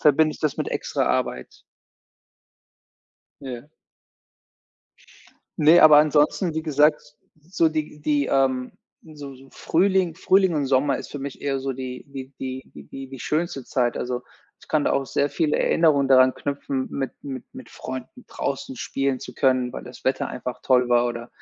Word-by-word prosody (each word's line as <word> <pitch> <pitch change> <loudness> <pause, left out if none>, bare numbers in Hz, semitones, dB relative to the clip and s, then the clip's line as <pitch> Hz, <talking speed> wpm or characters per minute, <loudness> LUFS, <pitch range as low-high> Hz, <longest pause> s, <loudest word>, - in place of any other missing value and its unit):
verbinde 155 +1 +4
ich - - -13
das 150 -3 0
mit - - -1
extra - - -1
Arbeit. 65 - -2 1.8
Ja. 130 +1 -8 1.9
Ne, 160 +3 +7
aber 155 -1 +9
ansonsten, 155 +3 +2
wie 160 - -2
gesagt, 150 0 +1 0.3
so 165 -3 +3
die 155 -1 -4
die 145 -1 +1
ähm, 130 -2 +1 0.3
so 145 -3 -10
so 135 +1 -16
Frühling 185 -1 +1
Frühling 190 0 +3
und 145 -2 0
Sommer 135 0 +2
ist - - -9
für 145 - -6
mich 140 0 -7
eher 140 -1 -1
so 135 0 -3
die 130 -1 -7
die 135 -1 -9
die 130 0 -5
die 75 - -12
die 135 0 -8
die 135 -1 -9
schönste 155 -1 -2
Zeit, 120 -2 0
also, 125 0 -3 0.4
ich - - -19
kann 155 -2 +1
da - - +1
auch 135 0 +1
sehr 140 - 0
viele 155 -3 0
Erinnerungen 150 -4 +3
daran 130 -1 +6
knüpfen, 140 -1 -3
mit 135 -1 -3
mit 135 -3 -6
mit 130 - -11
Freunden 130 - -8
draußen 135 -1 -4
spielen 135 +1 -1
zu - - -10
können, 130 -2 +1
weil - - -6
das 125 0 -13
Wetter 130 0 0
einfach 125 0 -6
toll 125 -1 +3
war 120 0 +3
oder 120 0 -5
135 Hz, 170 wpm, -23 LUFS, 130-150 Hz, 1.9 s, aber